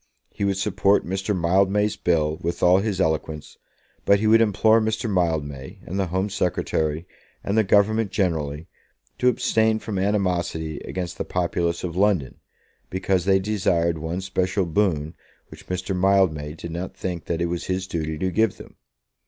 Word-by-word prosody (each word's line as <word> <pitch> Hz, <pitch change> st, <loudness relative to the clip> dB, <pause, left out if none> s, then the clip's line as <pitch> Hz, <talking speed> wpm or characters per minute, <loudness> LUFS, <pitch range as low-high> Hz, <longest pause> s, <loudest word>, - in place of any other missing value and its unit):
He 100 Hz, -, -5 dB
would 100 Hz, -1 st, +1 dB
support 100 Hz, 0 st, +2 dB
Mr. 95 Hz, +1 st, -2 dB
Mildmay's 95 Hz, +4 st, +2 dB
bill 80 Hz, -3 st, 0 dB
with 85 Hz, +1 st, -3 dB
all 90 Hz, +1 st, +6 dB
his 100 Hz, -2 st, -2 dB
eloquence, 80 Hz, -3 st, -2 dB, 0.4 s
but 100 Hz, 0 st, +4 dB
he 110 Hz, -, -1 dB
would 110 Hz, +1 st, +6 dB
implore 110 Hz, +1 st, +4 dB
Mr. 110 Hz, +1 st, -1 dB
Mildmay, 80 Hz, -8 st, -2 dB
and 95 Hz, +3 st, -4 dB
the 95 Hz, -, 0 dB
Home 95 Hz, +4 st, -1 dB
Secretary, 80 Hz, -4 st, -1 dB, 0.4 s
and 100 Hz, -, -1 dB
the 110 Hz, -, +4 dB
Government 105 Hz, +2 st, +3 dB
generally, 80 Hz, -5 st, -2 dB, 0.5 s
to 125 Hz, -, +2 dB
abstain 110 Hz, -2 st, +2 dB
from 105 Hz, -3 st, -4 dB
animosity 90 Hz, -6 st, -1 dB
against 90 Hz, -2 st, -5 dB
the -, -, 0 dB
populace 85 Hz, -1 st, -1 dB
of 85 Hz, -2 st, -4 dB
London, 95 Hz, -9 st, +1 dB, 0.5 s
because 95 Hz, -1 st, 0 dB
they 95 Hz, -1 st, +4 dB
desired 90 Hz, -5 st, 0 dB
one 80 Hz, +4 st, -3 dB
special 95 Hz, 0 st, -1 dB
boon 80 Hz, -3 st, 0 dB, 0.4 s
which -, -, -14 dB
Mr. 90 Hz, +1 st, -3 dB
Mildmay 90 Hz, -6 st, +2 dB
did 85 Hz, +1 st, -8 dB
not 90 Hz, +3 st, -5 dB
think 90 Hz, -4 st, -4 dB
that 85 Hz, -, -2 dB
it 85 Hz, -, +1 dB
was 85 Hz, 0 st, -3 dB
his 95 Hz, 0 st, -2 dB
duty 80 Hz, -3 st, -3 dB
to 95 Hz, +3 st, -1 dB
give 110 Hz, 0 st, +1 dB
them. -, -, -13 dB
95 Hz, 165 wpm, -23 LUFS, 85-100 Hz, 0.5 s, all